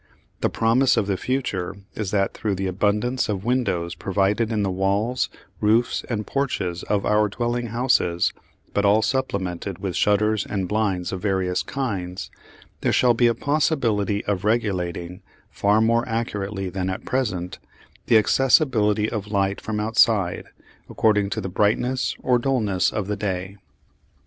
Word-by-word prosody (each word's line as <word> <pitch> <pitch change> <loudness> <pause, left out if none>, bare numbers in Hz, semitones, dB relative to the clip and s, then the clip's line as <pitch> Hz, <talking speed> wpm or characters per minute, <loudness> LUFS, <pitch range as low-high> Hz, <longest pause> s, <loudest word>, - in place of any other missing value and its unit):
The - - +1
promise 115 +4 +3
of 105 - +2
the 100 -1 0
future 100 -7 -2 0.2
is 105 -3 -3
that, 100 -1 0
through 105 -3 -2
the 95 +1 -3
abundance 105 +7 0
of 100 -1 -2
windows 100 -9 0
provided 100 +4 0
in 105 -2 0
the 95 - 0
walls, 100 +6 0 0.3
roofs 110 +3 +2
and 110 -3 -2
porches 95 -10 -2
of 100 -1 -1
our 105 0 +3
dwelling 120 +2 -2
houses 115 -7 +1 0.4
but 100 - +1
all 105 +2 +4
supplemented 100 -7 -2
with 95 -1 -4
shutters 105 0 +2
and 95 -3 -3
blinds 100 -3 -1
of 95 - -4
various 95 -3 0
kinds 95 -10 -4 0.5
there - - +1
shall 125 -1 +4
be 120 +1 +3
a 115 - +2
possibility 115 - 0
of 100 -2 -1
regulating, 90 -5 -1 0.3
far 105 +2 +2
more 115 +1 +3
accurately 105 -4 -3
than 95 0 -2
at 95 - -5
present, 100 -9 -2 0.5
the 115 - +6
accessibility 110 -3 +3
of 105 -3 -4
light 100 -1 0
from 105 -1 -3
outside 105 -4 +2 0.4
according 105 -3 +2
to 110 - -3
the 95 - -3
brightness 110 +7 0
or 125 -1 +3
dulness 110 -9 +1
of 105 - -2
the 105 +1 -2
day. 95 -1 -4
105 Hz, 150 wpm, -23 LUFS, 95-115 Hz, 0.5 s, the